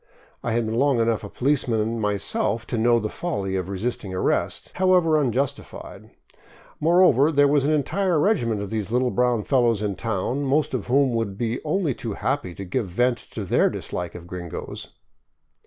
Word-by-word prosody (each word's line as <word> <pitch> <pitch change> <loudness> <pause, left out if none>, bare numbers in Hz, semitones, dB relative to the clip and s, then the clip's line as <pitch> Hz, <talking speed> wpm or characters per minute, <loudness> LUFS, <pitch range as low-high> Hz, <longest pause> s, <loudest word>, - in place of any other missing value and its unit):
I - - -2
had 115 0 +1
been 110 +2 -1
long 140 -3 +3
enough 115 -1 +1
a 100 - -7
policeman 115 -5 0
myself 105 +2 -1
to 120 - -3
know 120 +1 +4
the 110 - -2
folly 100 - -3
of 95 -1 -3
resisting 100 -1 -3
arrest, 90 - -1
however 180 -3 +4
un 145 -5 +2
justified; 140 +3 -4 0.7
moreover, 160 -3 +4
there 145 -1 +4
was 140 -1 +2
an 150 - +2
entire 175 +4 +1
regiment 120 - +1
of 100 - -7
these 110 -3 -2
little 125 +1 +1
brown 125 -3 +1
fellows 120 -5 +2
in 105 -1 -1
town, 115 +6 -2
most 140 +2 +1
of 125 -6 -3
whom 135 0 +3
would 110 -4 -2
be 115 +1 -2
only 155 -2 0
too 115 -2 -5
happy 105 -5 -2
to 100 - -7
give 105 +4 -2
vent 120 +6 +1
to 105 - -7
their - - +3
dislike 90 -1 -5
of 85 -1 -9
gringos. 90 -1 -7
120 Hz, 180 wpm, -24 LUFS, 105-140 Hz, 0.7 s, know